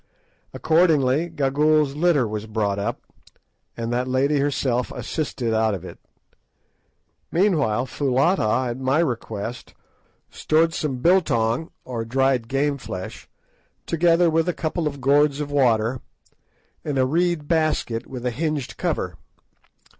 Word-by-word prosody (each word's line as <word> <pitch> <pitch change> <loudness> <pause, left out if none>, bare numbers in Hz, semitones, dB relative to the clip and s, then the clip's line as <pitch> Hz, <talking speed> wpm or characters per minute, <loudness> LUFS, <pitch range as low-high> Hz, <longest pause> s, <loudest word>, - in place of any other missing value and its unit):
Accordingly 160 -2 +2
Gagool's 150 -1 +2
litter 155 -6 +2
was 105 0 -5
brought 105 -2 -1
up, 100 - -3 0.7
and 115 0 -3
that 125 +1 -1
lady 135 +3 +1
herself 130 -3 0
assisted 130 -7 -3
out 110 -1 +2
of 95 -1 -8
it. 85 - -10 1.3
Meanwhile 155 - +2
Foulata, 130 - +1
at 120 - -6
my 135 +2 +1
request, 120 -6 -3 0.6
stored 165 +1 +1
some 135 -6 -3
"biltong," 155 -7 +2 0.2
or 120 -3 -4
dried 130 0 +1
game 140 +2 0
flesh, 95 -6 -7 0.6
together 170 +1 +3
with 165 +2 +1
a - - 0
couple 160 0 -1
of 140 -2 -5
gourds 140 +2 +3
of 145 -1 -4
water, 120 -3 +2 0.8
in 145 -2 -2
a 130 - +3
reed 170 +1 0
basket 155 -8 0
with 125 -2 -7
a 125 - +1
hinged 150 +1 -3
cover. - - -2
135 Hz, 125 wpm, -23 LUFS, 120-155 Hz, 1.3 s, together